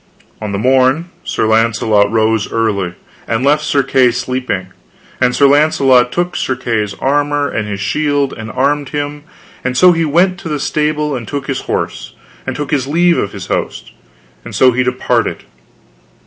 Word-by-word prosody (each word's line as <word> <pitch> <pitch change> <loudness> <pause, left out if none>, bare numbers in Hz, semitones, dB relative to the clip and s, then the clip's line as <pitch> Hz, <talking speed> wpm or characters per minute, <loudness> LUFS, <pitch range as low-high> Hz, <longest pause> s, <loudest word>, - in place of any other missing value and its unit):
On 105 -1 -4
the 100 - -2
morn 130 - +2
Sir - - -1
Launcelot 110 -2 +2
arose 110 0 0
early, 100 -6 -1 0.3
and 115 +2 -1
left 150 +2 +3
Sir 145 -2 +1
Kay 130 -2 +3
sleeping; 125 -6 -3 0.5
and 125 - +2
Sir 140 - +4
Launcelot 135 -4 +4
took 175 +1 -2
Sir 130 - -1
Kay's 110 -5 -2
armor 145 +1 0
and 105 -5 -3
his 100 -1 -4
shield 145 +5 0
and 110 0 -8
armed 140 +2 0
him, 145 0 -4 0.4
and 125 0 -2
so 180 +4 +7
he 165 -1 +1
went 175 +4 +2
to 185 - -7
the 150 -1 -2
stable 150 0 -1
and 120 -4 -6
took 140 -2 -4
his 135 -2 -3
horse, - - -3 0.3
and - - -3
took 145 -1 -4
his 135 -3 0
leave 170 +3 +2
of 100 - -2
his 100 -3 -7
host, - - -4 0.5
and - - -8
so 130 -1 +5
he 125 +1 0
departed. 125 0 -1
130 Hz, 175 wpm, -15 LUFS, 115-145 Hz, 0.5 s, so